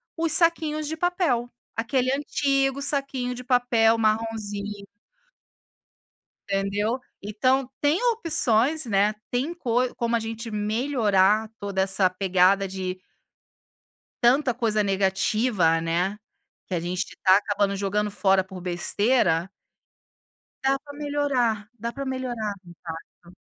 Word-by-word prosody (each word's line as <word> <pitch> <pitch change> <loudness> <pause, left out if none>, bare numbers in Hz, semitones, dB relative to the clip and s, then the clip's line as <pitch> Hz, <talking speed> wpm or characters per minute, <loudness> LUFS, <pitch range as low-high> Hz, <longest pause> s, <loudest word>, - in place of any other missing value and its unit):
os 330 -1 0
saquinhos 315 -3 +2
de 320 - -3
papel, 320 -9 0 0.3
aquele 255 +3 0
antigo 275 -1 0
saquinho 275 -3 -1
de 250 - -8
papel 245 -3 +3
marronzinho. 215 -2 -2 1.7
Entendeu, 200 +4 0 0.2
então, 255 +6 +1
tem 295 +8 +2
opções, 310 - +2
né, 205 -1 +2 0.2
tem 260 +7 -1
coi 250 -6 0
como 235 0 0
a - - +2
gente 225 +1 -6
melhorar, 215 -2 +1
toda 200 -1 -1
essa 190 -1 +3
pegada 185 +1 +2
de 185 -1 -4 1.2
tanta 255 +2 +4
coisa 220 -2 0
negativa, 195 -2 +1
né, 175 +5 -1 0.5
que 185 - -4
a 170 - 0
gente 180 +3 -4
tá 190 0 +6
acabando 205 -1 0
jogando 205 +1 -1
fora 195 -1 +2
por 190 0 -10
besteira 180 0 +1 1.1
dá 270 0 +2
pra 290 0 -12
melhorar, 280 -7 -1
dá 235 +2 -4
pra 275 +2 -5
melhorar 245 -5 -3
exato. 170 +1 -11
225 Hz, 115 wpm, -25 LUFS, 195-260 Hz, 1.7 s, tá